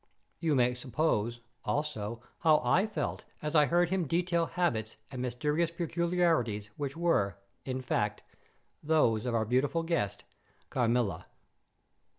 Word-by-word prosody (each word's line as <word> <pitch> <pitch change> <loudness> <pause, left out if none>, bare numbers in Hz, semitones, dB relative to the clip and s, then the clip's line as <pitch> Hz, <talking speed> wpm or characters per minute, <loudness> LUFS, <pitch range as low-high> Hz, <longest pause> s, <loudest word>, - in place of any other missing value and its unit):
You 160 -3 +1
may 125 -1 +3
suppose, 125 -3 -1 0.2
also, 120 -7 -2 0.2
how 155 -2 +5
I 195 +4 +3
felt 215 - -3 0.2
as 150 - -2
I 150 -2 +5
heard 175 0 +3
him 185 -4 +1
detail 170 +1 +1
habits 115 - -1
and 130 -2 -5
mysterious 150 +7 0
peculiarities 170 - 0
which 145 +1 -4
were, 105 - +2 0.3
in 130 0 -2
fact, 105 -4 -1 0.6
those 130 -7 +2
of 120 - 0
our 110 -1 +2
beautiful 135 +8 +1
guest, 165 - -1 0.5
Carmilla! 115 -8 +1
140 Hz, 130 wpm, -31 LUFS, 115-165 Hz, 0.6 s, how